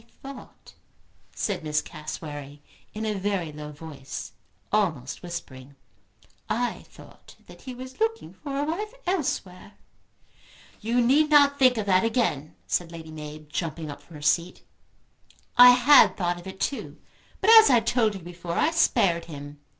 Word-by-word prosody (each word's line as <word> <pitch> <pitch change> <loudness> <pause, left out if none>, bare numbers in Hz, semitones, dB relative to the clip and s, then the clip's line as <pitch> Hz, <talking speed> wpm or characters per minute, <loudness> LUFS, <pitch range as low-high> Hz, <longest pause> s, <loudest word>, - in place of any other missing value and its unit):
"I 270 +4 -12
thought," 255 - -15 0.6
said 200 -6 -2
Miss 150 -1 0
Cassewary, 150 -2 -8 0.3
in 220 +1 -5
a 215 - -1
very 195 -5 -2
low 150 0 -8
voice, 145 -2 -8 0.4
almost 165 -12 -1
whispering, 140 -6 -8 0.7
"I 240 +3 -2
thought - - -16
that - - -15
he 255 -2 -8
was 255 +1 -10
looking 450 0 -2
for 280 -2 -7
a 285 - 0
wife 410 +10 -4
elsewhere." 230 - -3 1.1
"You 235 +3 0
need 285 +6 +3
not 285 -1 +5
think 255 -2 +5
of 215 - -2
that 185 -2 +3
again," 220 - -1
said 170 -1 -1
Lady 160 -1 -10
Mab, 150 -1 -9
jumping 160 -1 -4
up 145 0 -11
from 160 +2 -16
her 150 - -10
seat. 170 +4 0 0.9
"I 245 0 +10
had 250 +4 +6
thought 175 -2 -1
of 175 - -12
it 190 0 -9
too. 275 - -4 0.4
But 430 +3 +4
as 440 - +5
I 245 - +6
told 225 -2 +1
you 190 - -8
before, 175 0 -7
I 320 - +2
spared 195 - +2
him. 145 -2 -10
190 Hz, 160 wpm, -25 LUFS, 155-250 Hz, 1.1 s, I